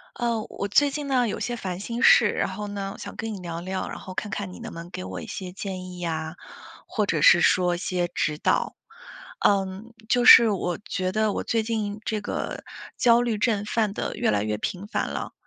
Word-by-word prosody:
呃， 235 -2 -1
我 200 - -4
最 285 +8 +4
近 290 0 -4
呢， 255 -3 +2
有 210 - -3
些 240 - -2
烦 185 -5 -5
心 235 +4 -4
事， 230 - +7
然 - - -1
后 205 +2 -5
呢， 200 -1 -4
我 - - -12
想 - - -8
跟 225 0 -4
你 195 - -6
聊 170 -1 -5
聊， 185 +1 -3
然 - - -7
后 185 - -9
看 205 +2 -4
看 195 -2 -4
你 - - -11
能 - - -7
不 165 - -7
能 170 +1 -9
给 135 - -6
我 95 -1 -6
一 - - -9
些 185 -2 -6
建 185 -1 -6
议 180 -1 -9
呀， 160 -1 -3 0.5
或 215 - 0
者 160 -6 0
是 175 - +8
说 180 -1 +3
一 - - -4
些 180 0 -1
指 155 -3 -1
导。 - - 0 0.7
嗯， 195 +3 +1 0.2
就 245 0 +3
是 230 -2 +10
我 180 -4 -2
觉 185 -1 -1
得 215 +1 +1
我 - - -2
最 230 - 0
近 215 -2 -2
这 215 -2 -1
个 - - -4 0.3
焦 235 -1 +5
虑 235 -3 0
症， 210 -1 +1
犯 210 -1 0
得 - - -3
越 - - +1
来 105 -1 +1
越 105 0 -1
频 185 - -4
繁 - - -1
了。 - - -5
200 Hz, 250 characters per minute, -25 LUFS, 180-220 Hz, 0.7 s, 是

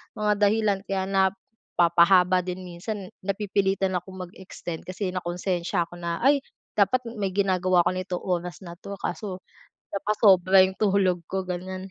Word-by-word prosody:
mga 210 -1 +1
dahilan 210 -2 +1
kaya 190 -1 -1
napapahaba 185 -2 +3
din 185 0 -5
minsan, 185 +3 -6 0.2
napipilitan 195 -1 0
akong 185 +1 -9
mag-extend 175 -3 -8
kasi 185 +1 -3
nakonsensya 180 0 -1
ako 175 - -11
na 170 -1 -2
ay 280 +2 +5 0.4
dapat 250 +5 +3 0.2
may 195 -2 -1
ginagawa 185 -2 +3
ako 175 - +3
nito 185 0 -3
oras 180 0 -3
na 170 -1 -9
'to, 200 - -7
kaso 190 -4 -4 0.5
napasobra 195 -2 +5
'yong 190 0 -4
tulog 190 -4 +2
ko, 190 0 -2
ganyan. 185 +1 -5
190 Hz, 140 wpm, -25 LUFS, 180-200 Hz, 0.5 s, ay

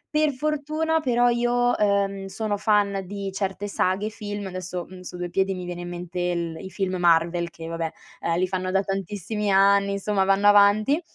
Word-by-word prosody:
Per 305 -1 +3
fortuna 305 +3 0
però 245 -4 +2
io, 245 0 +2
ehm, 200 -1 +1
sono 205 +2 -2
fan 205 -2 +2
di 200 0 -5
certe 195 +1 -3
saghe, 195 +2 0
film. 205 -1 -6
Adesso, 185 -1 -5
mhmm, 185 0 -11
su 180 0 -8
2 175 -1 -4
piedi 195 0 +1
mi 180 -1 -6
viene 175 0 -5
in 175 - -6
mente 175 0 -6
il 170 -2 -1
i 190 - -7
film 190 0 -2
Marvel 170 0 +2
che, 165 -1 -10
vabbè, 165 -1 -3 0.3
ehm, 170 0 -1
li 185 - +1
fanno 185 0 -2
da 195 +1 +2
tantissimi 200 +2 -3
anni, 200 +1 +4
insomma, 200 0 0
vanno 195 +1 +3
avanti, 205 +8 +5
195 Hz, 190 wpm, -24 LUFS, 180-210 Hz, 0.3 s, avanti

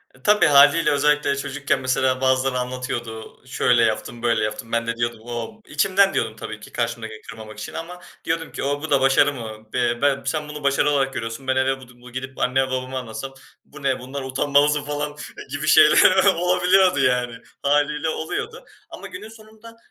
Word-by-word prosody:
Eee, 130 - -22
tabii, 210 0 +4
hâliyle 145 +3 +5
özellikle 150 0 +2
çocukken, 140 0 -2
mesela 130 0 0
bazıları 130 0 +1
anlatıyordu 125 -3 -6
"Şöyle 125 -2 +2
yaptım, 115 +2 -2
böyle 115 -2 +2
yaptım." 115 +2 -5
ben 115 0 -1
de 115 - -1
diyordum 120 -1 -2
"O." 120 - -6
içimden 195 0 +2
diyordum 110 -1 -1
tabii 110 0 -8
ki, 105 - -13
karşımdakini 110 -2 -4
kırmamak 110 -1 -11
için, 105 - -7
ama 175 +2 -7 0.2
diyordum 165 0 -2
ki, - - -5
"O, 145 +1 -1
bu 160 - -5
da 140 -2 +3
başarı 135 +2 +4
mı?" 110 -3 -9
Be 120 -1 0
ben 140 -1 +2
sen 150 +2 -2
bunu 150 -1 -8
başarı 140 +1 +2
olarak 135 -2 0
görüyorsun. 115 +3 -6
Ben 130 - +1
eve 135 0 +1
bu 130 -1 -14
d 120 -1 -20
bu 125 0 -13
gidip, 130 +1 -7
anneme 130 +1 +1
babama 130 0 -3
anlatsam 125 +3 -7 0.3
"Bu 150 -1 -14
ne? 135 -1 0
Bundan 130 +2 -6
uanmalısın." 145 +2 +2
falan 145 0 -4 0.4
gibi 145 +2 -4
şeyler 155 +5 +6
olabiliyordu 180 -1 +3
yani 125 -3 +1 0.3
hâliyle 150 +2 +1
oluyordu 445 - -5 0.2
ama - - -9
günün 365 -12 -9
sonunda, 220 +1 -15
135 Hz, 185 wpm, -22 LUFS, 120-150 Hz, 0.4 s, şeyler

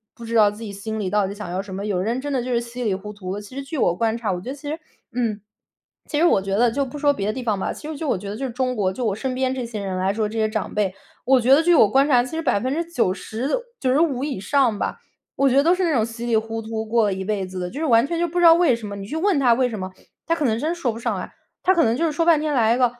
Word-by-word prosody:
不 235 - -12
知 230 0 -4
道 210 -2 +6
自 210 +2 -12
己 210 - -6
心 220 +2 -5
里 190 - -2
到 205 0 +1
底 195 - -5
想 205 -4 -7
要 180 - -2
什 195 -1 -9
么， 195 - -4
有 195 -4 -1
人 230 +6 -1
真 290 +1 -4
的 255 -3 0
就 255 - -4
是 235 - +2
稀 240 +1 -6
里 210 -4 +1
糊 210 +2 -7
涂 190 -3 -6
的。 205 - -5
其 230 +6 -12
实 275 - -3
据 285 +3 -6
我 175 - +2
观 225 +3 0
察， 215 -4 -2
我 180 - -2
觉 250 - -7
得 275 - -4
其 290 +1 -8
实 315 +2 -4 0.3
嗯， 225 -4 -1 0.7
其 295 - -2
实 330 - +3
我 195 - +4
觉 195 0 -2
得 235 +2 +3
就 275 +3 0
不 265 +3 -8
说 290 -1 +4
别 200 -7 -3
的 215 - 0
地 255 +1 -5
方 215 -4 0
吧， - - -2
其 300 - -9
实 315 - -5
就 315 - -4
我 215 - +1
觉 200 +2 -7
得 205 - -4
就 270 - -3
是 255 - -4
中 255 +1 -1
国， 195 -4 +1
就 245 +1 -3
我 200 - 0
身 255 +3 -3
边 260 0 0
这 255 -2 -3
些 220 -3 -5
人 190 -1 -3
来 190 +1 +1
说， 215 0 0
这 225 +2 -6
些 215 0 +2
长 215 -2 -3
辈， 200 -3 0 0.3
我 260 -1 +4
觉 260 +3 +5
得 305 - +6
据 345 +1 +4
我 220 - +7
观 270 +5 +4
察， 250 -4 +4
其 255 - -8
实 325 - -1
90% 255 - -1
的 - - +1 0.2
95 270 0 +1
以 285 -9 -3
上 245 0 +2
吧， - - -3 0.4
我 275 0 +3
觉 255 - +1
得 280 - +6
都 340 +3 +4
是 370 - -1
那 330 -3 +2
种 225 -4 +2
稀 230 +1 -7
里 230 -2 +3
糊 225 +1 -3
涂 220 0 -4
过 230 +1 +2
了 200 - +1
一 190 0 -5
辈 200 -2 -1
子 185 0 -7
的。 180 0 -3
就 280 - -7
是 320 - -1
完 235 -2 +4
全 340 +1 -2
就 345 - +1
不 350 +2 -2
知 350 - +4
道 330 - +10
为 330 -7 +4
什 225 -2 -7
么， 200 - -6
你 195 -1 -7
去 310 - -4
问 370 -3 +2
他 245 -4 +5
为 255 0 +2
什 220 -4 -5
么， 185 0 -5 0.4
他 330 - +2
可 305 - -1
能 225 -3 +1
真 315 +6 -1
说 275 -9 -1
不 225 - -7
上 - - -1
来。 - - -8 0.3
他 375 - +4
可 340 - +4
能 230 +1 +2
就 335 - +1
是 310 - 0
说 330 +3 0
半 330 -3 +5
天 305 -1 -1
来 230 -3 +3
一 - - -2
个： 250 - +4
235 Hz, 365 characters per minute, -22 LUFS, 210-280 Hz, 0.7 s, 道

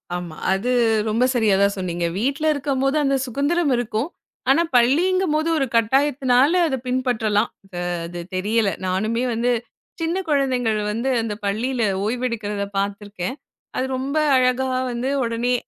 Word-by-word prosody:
ஆமா. 175 -3 -6 0.2
அது 210 +6 -1 0.4
ரொம்ப 225 +3 +2
சரியா 220 -5 +3
தான் 200 0 +2
சொன்னீங்க. 175 -2 -2
வீட்ல 275 +6 -1
இருக்கும்போது 275 -1 0
அந்த 275 -1 +2
சுதந்திரம் 285 +5 0
இருக்கும். 240 +3 -2 0.4
ஆனா 275 +5 +5
பள்ளிங்கும்போது 310 +5 +3
ஒரு 275 - +1
கட்டாயத்துனால 265 +3 +3
அத 270 - 0
பின்பற்றலாம். 235 -4 +1 0.2
அது 180 -2 -6 0.3
அது 175 0 -6
தெரியல. 210 +3 +1 0.2
நானுமே 215 +6 0
வந்து 235 +2 +1 0.5
சின்னக் 345 +3 -1
கொழந்தைகள் 255 -6 +1
வந்து 235 +5 -1
அந்தப் 210 -1 -5
பள்ளியில 235 +5 -1 0.2
ஓய்வு 240 +4 -1
எடுக்கறத 210 -4 -3
பாத்துருக்கேன். 200 +2 -3 0.4
அது 255 - 0
ரொம்ப 275 +4 -2 0.2
அழகா 255 0 +2 0.2
வந்து 240 +2 -2
உடனே 235 +1 0
245 Hz, 135 wpm, -22 LUFS, 210-270 Hz, 0.5 s, ஆனா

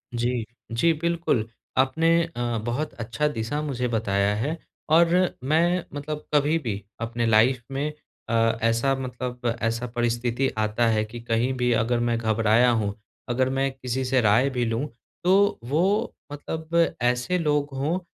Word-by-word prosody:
जी। 120 -1 -1 0.3
जी, 115 +9 +3
बिल्कुल। 165 -8 0 0.3
आपने 145 +6 +3
अ, 165 -7 -6 0.2
बहुत 140 +6 -2
अच्छा 115 +6 -2
दिशा 145 +2 -2
मुझे 125 -4 -2
बताया 105 -3 +1
हैं। 145 +10 -2 0.3
और 165 +2 +6 0.4
मैं 170 +5 +2
मतलब 150 +1 -5
कभी 150 +2 +3
भी 105 -8 -4 0.2
अपने 115 0 -1
लाइफ़ 115 +3 +4
में 140 +3 -1 0.4
अ, - - -1 0.3
ऐसा 115 +4 +2
मतलब 125 -2 -3
ऐसा 115 +2 -1
परिस्थिति 120 +2 0
आता 110 +2 +1
है 110 -1 +2
कि 115 +2 -9
कहीं 115 +3 +1
भी 125 0 +1
अगर 115 +1 +1
मैं 120 -1 +1
घबराया 110 +1 +3
हूँ, 110 -4 0 0.4
अगर 130 +2 +1
मैं 135 +1 0
किसी 130 0 -3
से 130 +1 +2
राय 115 +5 +4
भी 125 -2 -1
लूँ 115 +6 -1 0.4
तो 200 +3 +3
वो 175 - +1 0.2
मतलब 160 +3 -1
ऐसे 125 +8 +1
लोग 150 -3 +1
हों 155 +7 0
125 Hz, 150 wpm, -25 LUFS, 115-150 Hz, 0.4 s, और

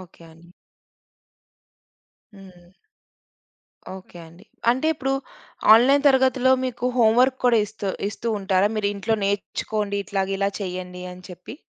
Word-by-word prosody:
Okay 170 -2 -16
అండి. 170 +1 -20 1.9
హ్మ్. 185 -3 -16 1.3
Okay 180 -2 -14
అండి. 170 +5 -17 0.3
అంటే 260 +6 -1
ఇప్పుడు 270 -2 -2 0.6
ఆన్‌లైన్ 275 +5 +4
తరగతిలో, 260 -1 +3
మీకు 245 -1 -5
హోంవర్క్ 245 +3 +3
కూడా 240 -2 +4
ఇస్తు 205 -2 -5 0.2
ఇస్తూ 225 +3 -6
ఉంటారా? 195 0 +1
మీరీంట్లో 205 +1 -1
నేర్చుకోండి 205 +1 -2
ఇట్లాగ 195 0 -2
ఇలా 200 0 0
చేయండి 180 -1 -6
అని 180 0 -13
చెప్పి. 180 +9 -11
205 Hz, 115 wpm, -23 LUFS, 185-245 Hz, 1.9 s, ఆన్‌లైన్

